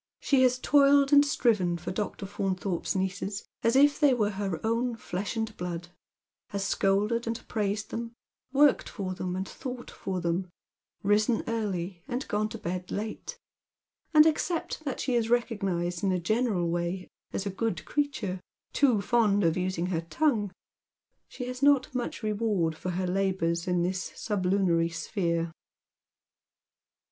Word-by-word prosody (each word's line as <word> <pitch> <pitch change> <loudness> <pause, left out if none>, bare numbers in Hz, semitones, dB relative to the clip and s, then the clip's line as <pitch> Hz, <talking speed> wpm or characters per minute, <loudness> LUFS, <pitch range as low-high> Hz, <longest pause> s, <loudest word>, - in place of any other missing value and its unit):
She 275 -2 +3
has 250 -1 +4
toiled 280 +1 +5
and 285 0 +8
striven 210 - +2
for 175 +1 -5
Dr. 200 0 -3
Faunthorpe's 190 -2 -2
nieces 190 +1 -2 0.2
as 230 +2 +2
if 285 +1 +5
they 285 -4 +5
were 210 -3 +1
her 195 -4 -3
own 230 +2 0
flesh 205 0 -4
and 220 -1 -2
blood; 175 -1 -4 0.6
has 200 -1 -2
scolded 210 +5 +1
and 230 0 -4
praised 210 -1 -2
them, 230 0 -5 0.4
worked 285 +1 +4
for 190 -4 -4
them 180 0 -3
and 190 +1 -3
thought 250 -2 -7
for 185 -1 -4
them, 175 +2 -1 0.5
risen 210 +3 +3
early 195 -6 -2
and 250 +3 -3
gone 215 +1 0
to 225 - -6
bed 180 -2 -4
late; 215 +1 -5 0.7
and 305 -1 +8
except 320 0 0
that 275 - -3
she 255 - -1
is 230 -2 +1
recognised 195 -7 0
in 195 - +2
a 185 - +2
general 210 -1 +1
way 175 +2 -2 0.2
as 195 - -3
a 200 - -1
good 190 -3 -2
creature, 230 -11 -2 0.3
too 250 -8 +3
fond 210 -3 +3
of 165 -1 +3
using 185 -1 -1
her 175 -3 -1
tongue, 210 - 0 0.8
she 250 - -6
has 250 +1 -6
not 280 -1 +4
much 245 -2 -3
reward 210 -6 0
for 185 - -5
her 185 +1 -1
labours 180 -2 0
in 180 -1 +2
this 185 +1 -2
sublunary 185 -4 +1
sphere. 170 -1 -1
200 Hz, 155 wpm, -28 LUFS, 180-240 Hz, 0.8 s, and